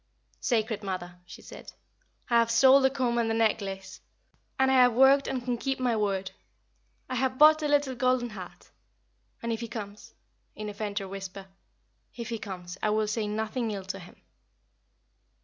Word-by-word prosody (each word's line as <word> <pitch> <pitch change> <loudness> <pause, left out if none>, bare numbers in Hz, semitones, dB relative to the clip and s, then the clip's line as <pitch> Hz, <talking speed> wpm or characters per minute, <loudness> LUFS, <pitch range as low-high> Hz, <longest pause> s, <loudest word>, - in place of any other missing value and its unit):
"Sacred 220 -3 0
Mother," 180 -3 -5
she - - -12
said, - - -11 0.5
"I 235 -2 +4
have 230 0 +2
sold 265 +3 +6
the - - +5
comb 250 -3 0
and 230 -1 +1
the 225 - 0
necklace, 200 -3 -1 0.6
and 265 0 +3
I - - +3
have 250 -2 +6
worked 270 +3 +5
and 255 -2 -3
can 245 -2 -1
keep 270 +1 -2
my 245 -2 +1
word. 195 -3 -1 0.8
I 255 - -5
have 260 +1 0
bought 310 +2 +7
a 300 - 0
little 290 -2 +2
golden 255 -1 +1
heart. 185 -4 -11 0.7
And 230 0 -1
if 225 - -4
he 235 - -5
comes" 210 -3 -8 0.4
in 215 0 -5
a - - -7
fainter 205 -1 -4
whisper 195 0 -7 0.7
"if 235 -1 -6
he 230 -2 -3
comes 185 -3 -8
I 215 - +1
will 215 0 +1
say 215 0 -1
nothing 220 +3 -2
ill 200 -3 -5
to 195 +1 -5
him." 180 -1 -13
225 Hz, 180 wpm, -28 LUFS, 200-255 Hz, 0.8 s, bought